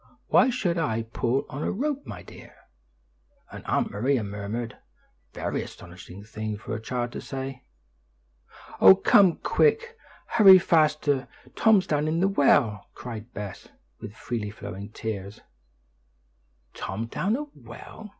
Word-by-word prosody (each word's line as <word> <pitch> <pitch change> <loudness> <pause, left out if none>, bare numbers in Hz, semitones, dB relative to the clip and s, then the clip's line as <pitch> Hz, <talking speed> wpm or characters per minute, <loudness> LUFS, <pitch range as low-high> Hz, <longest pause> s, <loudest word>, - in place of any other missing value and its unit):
"Why 255 +2 +5
should 195 -9 -1
I 115 -8 -1
pull 120 +3 -1
on 140 - -7
a - - -1
rope, 285 +5 -3
my - - -8
dear?" - - -14 1.0
and - - -9
Aunt - - 0
Maria 120 +4 0
murmured, 105 +3 -5 0.6
"Very - - -3
astonishing 90 +2 -11
thing 110 0 -5
for - - -7
a 110 - -4
child 120 +1 -3
to - - -6
say." 135 -1 -6 1.1
"Oh, 95 0 +9
come 190 -5 +5
quick! 460 +1 +1 0.3
Hurry 200 -5 +8
faster! 150 -5 +2 0.3
Tom's 215 -4 +4
down 150 -3 0
in 160 +2 0
the 190 - +3
well!" 135 - +2
cried 115 -1 -8
Bess, 100 -2 -7 0.3
with 110 -1 -9
freely 115 -4 -4
flowing 100 -1 -8
tears. 105 -1 -6 1.3
"Tom 110 +4 -4
down 195 - -1
a 290 - -3
well! 215 -1 -12
125 Hz, 135 wpm, -26 LUFS, 105-175 Hz, 1.3 s, Oh